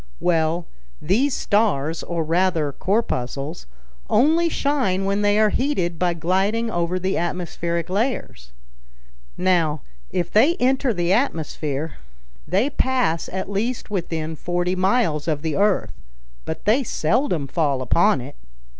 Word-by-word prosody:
"Well, 165 0 +1 0.3
these 250 - +1
stars, 165 -8 +1
or 170 -2 -2
rather 165 -2 +1
corpuscles, 145 - -2 0.4
only 320 +8 +4
shine 255 - 0
when 200 +1 0
they 205 0 +3
are 215 -1 +4
heated 185 - -1
by 175 -1 +1
gliding 195 +7 0
over 175 0 0
the 185 +1 -1
atmospheric 170 -1 -2
layers. 190 - -2 0.9
Now, 170 -5 +1 0.3
if 175 -1 -2
they 270 +11 +4
enter 265 -2 +2
the 175 -3 +1
atmosphere, 160 - -2 0.5
they 210 +11 +1
pass 255 -13 0
at 190 +1 -4
least 215 +4 -3
within 165 -4 -3
forty 175 +3 -1
miles 185 -5 +1
of 150 -2 -1
the 160 -2 -1
earth, 205 0 +1 0.5
but - - -5
they 225 +6 +4
seldom 170 - 0
fall 140 -3 0
upon 170 - +3
it. 140 +4 -9
180 Hz, 130 wpm, -22 LUFS, 160-215 Hz, 0.9 s, only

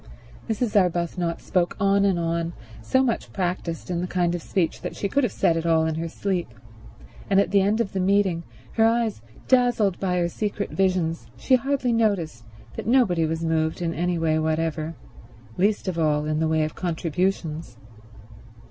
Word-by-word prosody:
Mrs. 220 0 -1
Arbuthnot 175 -2 +1
spoke 180 -2 0
on 200 0 +3
and 195 -3 +2
on, 170 0 -1 0.3
so 260 - +2
much 240 -4 -1
practiced 180 -2 -3
in 175 -1 -1
the 180 - -2
kind 175 -1 0
of 175 - -3
speech 170 0 -1
that - - -5
she 200 - -2
could 280 +7 +1
have 240 - +1
said 165 - +2
it 165 - -1
all 160 -1 +3
in 160 - 0
her 165 +2 -3
sleep, 185 0 -2 0.8
and 195 - +4
at 200 - +1
the 200 -1 +5
end 205 +3 +1
of 215 -4 -1
the 190 - -1
meeting, 190 -2 +2 0.3
her 225 - +2
eyes 225 - +2 0.3
dazzled 245 -7 +3
by 180 -2 0
her 175 -1 +2
secret 205 +3 -3
visions, 180 -4 0
she 265 - 0
hardly 255 -1 +2
noticed 180 - 0 0.3
that - - -5
nobody 205 -10 +3
was 160 +1 -2
moved 160 -1 0
in 170 -2 -1
any 175 +1 -1
way 160 -1 +1
whatever, 160 0 -1 0.6
least 205 +2 +1
of 175 -2 -2
all 150 -2 +2
in 155 0 -1
the 160 - +1
way 160 0 +2
of 155 - -3
contributions. 165 -5 -2
175 Hz, 185 wpm, -24 LUFS, 165-200 Hz, 0.8 s, the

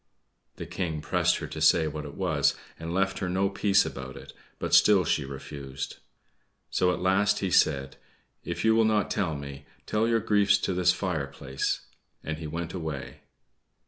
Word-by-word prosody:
The - - -7
King 80 -5 -3
pressed - - +1
her - - -5
to - - -6
say 80 -2 +5
what 75 0 -5
it 70 - -9
was, 80 -7 +1 0.2
and 80 0 -5
left 95 +2 0
her 90 - -2
no 95 +2 +1
peace 100 0 +3
about 65 -1 -7
it; - - -11 0.2
but - - -4
still 100 -3 +6
she 75 - 0
refused. 70 0 -7 0.7
So 90 0 +2
at - - -1
last 105 +3 +2
he 95 -3 -2
said, 70 -4 +2 0.5
"If - - -3
you 110 - +5
will 115 0 +4
not 110 -2 +1
tell 90 -7 0
me, 70 0 -8 0.2
tell 110 +1 +1
your 115 -1 +3
griefs 105 -2 +3
to 95 - -2
this 90 0 +4
fireplace;" 70 -8 -2 0.4
and 80 0 -4
he 80 - -5
went 85 +2 -4
away. 80 -6 -5
90 Hz, 175 wpm, -27 LUFS, 70-100 Hz, 0.7 s, still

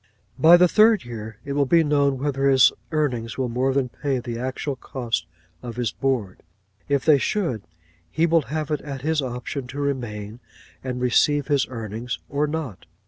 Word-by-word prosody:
By 170 +2 +8
the 180 +1 +6
third 215 - +4
year 110 -2 -7
it 140 - -3
will 140 -1 +1
be 165 +3 +5
known 140 -2 +2
whether 140 0 0
his 130 -2 +6 0.2
earnings 125 -7 -1
will 130 -2 -1
more 125 +3 0
than 135 -1 0
pay 140 +1 -2
the 120 -1 -5
actual 130 +3 -3
cost 125 -2 -3 0.3
of 120 -2 -7
his 120 -2 -1
board; 125 -9 -2 0.5
if 140 -2 +1
they 150 -3 +6
should, 145 - -1 0.5
he 160 - +1
will 165 -1 +3
have 155 0 -3
it 150 - -1
at 140 -3 -7
his 155 0 +1
option 125 +1 -5
to 135 +3 -7
remain 120 -6 -3 0.4
and 125 -1 -4
receive 145 +4 +2
his 140 -3 +2
earnings, 115 0 -5
or 145 +2 0
not. 150 - -5
135 Hz, 180 wpm, -23 LUFS, 120-150 Hz, 0.5 s, By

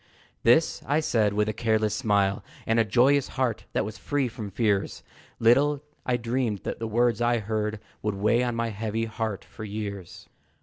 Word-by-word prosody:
This 125 +8 +4
I 145 +2 +3
said 110 -9 +1
with 105 +1 +1
a 110 - -1
careless 110 -1 +1
smile, 100 -4 +1 0.2
And 115 +1 +2
a - - +5
joyous 125 +6 +3
heart 125 -4 0
that - - +1
was 110 +1 -7
free 145 -3 0
from 110 -3 -6
fears; 100 -1 0 0.3
Little 140 +5 +3 0.2
I 125 -1 +2
dreamed 115 -3 -1
that - - -4
the 115 - -3
words 120 0 +2
I 120 0 +3
heard 110 0 -2 0.2
Would 105 -2 -1
weigh 110 +4 +2
on 120 -1 -1
my 115 0 -1
heavy 110 +1 -2
heart 110 -2 -4
for - - -10
years. 100 -3 -6
110 Hz, 180 wpm, -26 LUFS, 105-120 Hz, 0.3 s, a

